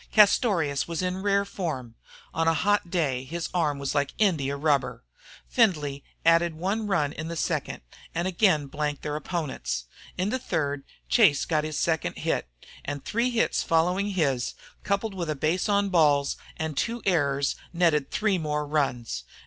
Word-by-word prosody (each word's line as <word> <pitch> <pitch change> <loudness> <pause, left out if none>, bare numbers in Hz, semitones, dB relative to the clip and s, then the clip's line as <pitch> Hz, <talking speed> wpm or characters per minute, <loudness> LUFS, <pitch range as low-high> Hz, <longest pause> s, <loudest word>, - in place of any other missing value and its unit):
Castorious 195 - +4
was 170 +1 -2
in 185 +1 -2
rare 200 0 +2
form; 150 - -4 0.4
on 165 0 +1
a 165 - +4
hot 205 +3 +1
day 145 -8 0
his 165 +5 -4
arm 155 -5 +1
was 140 -1 -2
like 145 -1 0
India 150 -10 +1
rubber. 145 -2 0 0.4
Findlay 150 - +1 0.2
added 165 0 +4
one 200 +6 -1
run 150 -8 +1
in 155 +2 -5
the 170 - -4
second - - -2 0.3
and 170 +2 0
again 180 -5 +3
blanked 145 0 -3
their 150 0 -2
opponents. 130 - -3 0.3
In 185 +2 0
the 260 - 0
third 145 - -2 0.2
Chase 185 - +4
got 155 -2 +1
his 155 -1 -3
second 160 -3 0
hit, - - -1 0.4
and 145 -1 -5
three 235 +3 +1
hits 235 -2 +1
following 180 +5 +2
his, 140 -10 0 0.3
coupled 200 +1 -1
with 175 -4 -4
a 155 - 0
base 165 +8 0
on 200 0 +2
balls 145 -5 +3 0.2
and 160 -3 -3
two 230 - -2
errors, 140 -7 +2 0.2
netted 165 -5 +2
three 210 -4 +1
more 150 -1 -1
runs. 125 - -1
160 Hz, 165 wpm, -26 LUFS, 145-190 Hz, 0.4 s, Castorious